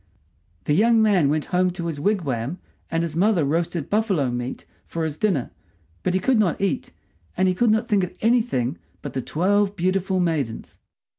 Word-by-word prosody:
The 150 Hz, -, +1 dB
young 225 Hz, +7 st, +4 dB
man 200 Hz, -9 st, +4 dB
went 155 Hz, +1 st, 0 dB
home 180 Hz, +1 st, +3 dB
to 175 Hz, -1 st, -5 dB
his 160 Hz, -4 st, -3 dB
wigwam, 145 Hz, -, -1 dB, 0.3 s
and 165 Hz, 0 st, 0 dB
his 165 Hz, -2 st, -4 dB
mother 185 Hz, -3 st, +3 dB
roasted 165 Hz, +1 st, -1 dB
buffalo 195 Hz, -, +1 dB
meat 120 Hz, +1 st, -5 dB, 0.2 s
for 165 Hz, -, -3 dB
his 155 Hz, -2 st, -2 dB
dinner; 160 Hz, -, 0 dB, 0.5 s
but 185 Hz, -, 0 dB
he -, -, +3 dB
could 250 Hz, +4 st, +2 dB
not 190 Hz, -6 st, +1 dB
eat, 195 Hz, -1 st, -1 dB, 0.5 s
and 185 Hz, +1 st, +3 dB
he 185 Hz, -, +3 dB
could 230 Hz, +6 st, +2 dB
not 220 Hz, +2 st, +2 dB
think 205 Hz, -3 st, +2 dB
of 180 Hz, -, -13 dB
anything 220 Hz, -, +1 dB, 0.2 s
but -, -, -6 dB
the 130 Hz, -, -2 dB
twelve 200 Hz, +8 st, +1 dB
beautiful 185 Hz, +1 st, 0 dB
maidens. 155 Hz, -10 st, -2 dB
180 Hz, 180 wpm, -23 LUFS, 150-205 Hz, 0.5 s, young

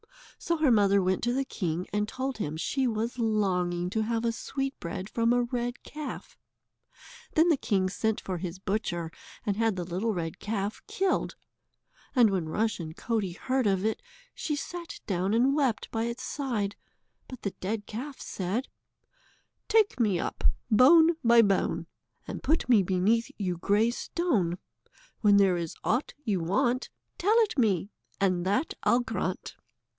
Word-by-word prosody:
So 335 Hz, -, 0 dB
her 305 Hz, -4 st, +3 dB
mother 200 Hz, -3 st, +5 dB
went 185 Hz, 0 st, +1 dB
to 240 Hz, -, +1 dB
the 270 Hz, +1 st, 0 dB
king 175 Hz, -6 st, -2 dB
and 210 Hz, 0 st, +1 dB
told 260 Hz, +1 st, -4 dB
him 155 Hz, -5 st, -3 dB
she 260 Hz, -, 0 dB
was 230 Hz, +2 st, -2 dB
longing 180 Hz, -5 st, 0 dB
to 220 Hz, -, 0 dB
have 225 Hz, +1 st, -1 dB
a 230 Hz, -, +2 dB
sweetbread 230 Hz, -8 st, -4 dB
from 230 Hz, +1 st, +1 dB
a 245 Hz, 0 st, +3 dB
red 240 Hz, 0 st, -3 dB
calf. 300 Hz, 0 st, -7 dB, 1.0 s
Then 320 Hz, +2 st, +5 dB
the 320 Hz, -, +4 dB
king 195 Hz, -7 st, +1 dB
sent 220 Hz, +3 st, -1 dB
for 185 Hz, -2 st, -4 dB
his 180 Hz, 0 st, -5 dB
butcher, 185 Hz, -4 st, -2 dB, 0.3 s
and 205 Hz, -, 0 dB
had 225 Hz, -2 st, +2 dB
the 180 Hz, -, -3 dB
little 190 Hz, +6 st, -2 dB
red 165 Hz, -2 st, -4 dB
calf 205 Hz, -1 st, -3 dB
killed. 385 Hz, 0 st, 0 dB, 0.8 s
And 235 Hz, -5 st, +6 dB
when 180 Hz, -4 st, -1 dB
Rushen 170 Hz, -4 st, -1 dB
Coatie 205 Hz, -7 st, -2 dB
heard 260 Hz, -3 st, 0 dB
of 195 Hz, 0 st, +1 dB
it, 220 Hz, -, 0 dB, 0.3 s
she 300 Hz, -, -2 dB
sate 340 Hz, +4 st, -6 dB
down 190 Hz, +2 st, 0 dB
and 255 Hz, +4 st, +4 dB
wept 270 Hz, -7 st, 0 dB
by 225 Hz, 0 st, -1 dB
its 235 Hz, +1 st, -4 dB
side, 220 Hz, -8 st, -2 dB, 0.5 s
but 255 Hz, -, -10 dB
the 200 Hz, -, -1 dB
dead 205 Hz, +3 st, -4 dB
calf 265 Hz, +6 st, -6 dB
said: 200 Hz, +8 st, -3 dB, 1.0 s
"Take 430 Hz, -8 st, +3 dB
me 205 Hz, -7 st, +2 dB
up, -, -, -4 dB, 0.3 s
bone 320 Hz, +8 st, +7 dB
by 235 Hz, 0 st, +7 dB
bone, 200 Hz, -2 st, +1 dB, 0.4 s
And -, -, -5 dB
put 320 Hz, +3 st, +1 dB
me 235 Hz, -5 st, +6 dB
beneath 195 Hz, +5 st, +1 dB
yon 180 Hz, -4 st, -2 dB
grey 205 Hz, +6 st, +2 dB
stone; 240 Hz, -, 0 dB, 0.6 s
When 205 Hz, -2 st, +5 dB
there 190 Hz, -3 st, +4 dB
is 170 Hz, -2 st, -4 dB
aught 245 Hz, +6 st, 0 dB
you 205 Hz, -5 st, +1 dB
want 220 Hz, +9 st, 0 dB, 0.3 s
Tell 420 Hz, +6 st, +3 dB
it 415 Hz, -10 st, 0 dB
me, 205 Hz, -4 st, +2 dB, 0.3 s
and 185 Hz, -3 st, +2 dB
that 205 Hz, +11 st, +1 dB
I'll 245 Hz, -, +3 dB
grant." 205 Hz, -5 st, -3 dB
220 Hz, 160 wpm, -28 LUFS, 190-250 Hz, 1.0 s, bone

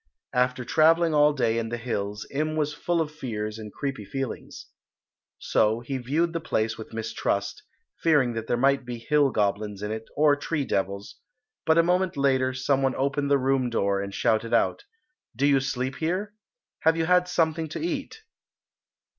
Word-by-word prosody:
After 125 Hz, 0 st, +1 dB
travelling 165 Hz, +3 st, +4 dB
all 150 Hz, 0 st, +5 dB
day 115 Hz, -5 st, +1 dB
in 115 Hz, -1 st, -3 dB
the 120 Hz, -, -3 dB
hills 105 Hz, -3 st, -3 dB
Im 155 Hz, +2 st, -1 dB
was 150 Hz, -1 st, 0 dB
full 170 Hz, +2 st, 0 dB
of 155 Hz, -2 st, -3 dB
fears 110 Hz, -7 st, -5 dB
and 105 Hz, -1 st, -8 dB
creepy 135 Hz, -4 st, -4 dB
feelings. 135 Hz, +3 st, -6 dB, 0.7 s
So 110 Hz, +2 st, +1 dB
he 130 Hz, +2 st, -4 dB
viewed 155 Hz, +7 st, 0 dB
the 165 Hz, -, -1 dB
place 110 Hz, -8 st, -1 dB
with 110 Hz, -, -10 dB
mistrust, 110 Hz, -2 st, -2 dB, 0.4 s
fearing 145 Hz, -7 st, +3 dB
that 115 Hz, 0 st, -5 dB
there 120 Hz, -, +1 dB
might 135 Hz, +2 st, +3 dB
be 120 Hz, -1 st, -6 dB
hill 145 Hz, +4 st, +2 dB
goblins 105 Hz, -2 st, -1 dB
in 105 Hz, -, -3 dB
it 110 Hz, 0 st, -5 dB
or 150 Hz, -1 st, +5 dB
tree 145 Hz, 0 st, -2 dB
devils, 100 Hz, -1 st, -3 dB, 0.5 s
but 160 Hz, +1 st, +4 dB
a 165 Hz, -, +6 dB
moment 180 Hz, -1 st, +1 dB
later 130 Hz, -2 st, +2 dB
some 130 Hz, +1 st, 0 dB
one 135 Hz, -1 st, +1 dB
opened 140 Hz, +1 st, 0 dB
the 140 Hz, -, +5 dB
room 130 Hz, -1 st, +1 dB
door 100 Hz, -4 st, 0 dB
and 100 Hz, 0 st, -5 dB
shouted 110 Hz, +3 st, +1 dB
out, 410 Hz, -, +1 dB, 0.5 s
"Do 135 Hz, +5 st, +1 dB
you 140 Hz, -1 st, +4 dB
sleep 130 Hz, 0 st, -3 dB
here? 185 Hz, +6 st, -2 dB, 0.5 s
Have 160 Hz, +1 st, +3 dB
you 165 Hz, -, +1 dB
had 180 Hz, +1 st, +3 dB
something 165 Hz, -2 st, 0 dB
to -, -, -5 dB
eat?" 335 Hz, +6 st, -4 dB
135 Hz, 180 wpm, -26 LUFS, 115-155 Hz, 0.7 s, a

